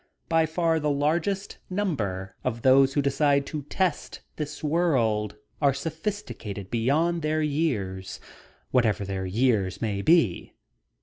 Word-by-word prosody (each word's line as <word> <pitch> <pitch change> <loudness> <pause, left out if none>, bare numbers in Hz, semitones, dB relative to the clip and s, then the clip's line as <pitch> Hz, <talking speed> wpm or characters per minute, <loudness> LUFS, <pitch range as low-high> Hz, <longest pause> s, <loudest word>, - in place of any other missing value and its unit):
By 165 -1 +3
far 165 0 +1
the 150 -1 0
largest 160 +7 -1
number 110 - -2
of 115 -2 -3
those 135 +1 +5
who 145 - +2
decide 140 0 +2
to 150 +1 -4
test 185 -4 -1
this 150 0 -6
world 130 - +1 0.3
are 140 -2 +3
sophisticated 155 - -5
beyond 155 +9 +1
their 155 0 0
years, 115 - -2 0.5
whatever 110 -5 +2
their 95 -1 -3
years 100 -3 +1
may 100 -3 -2
be. 140 - +2
140 Hz, 125 wpm, -26 LUFS, 110-160 Hz, 0.5 s, those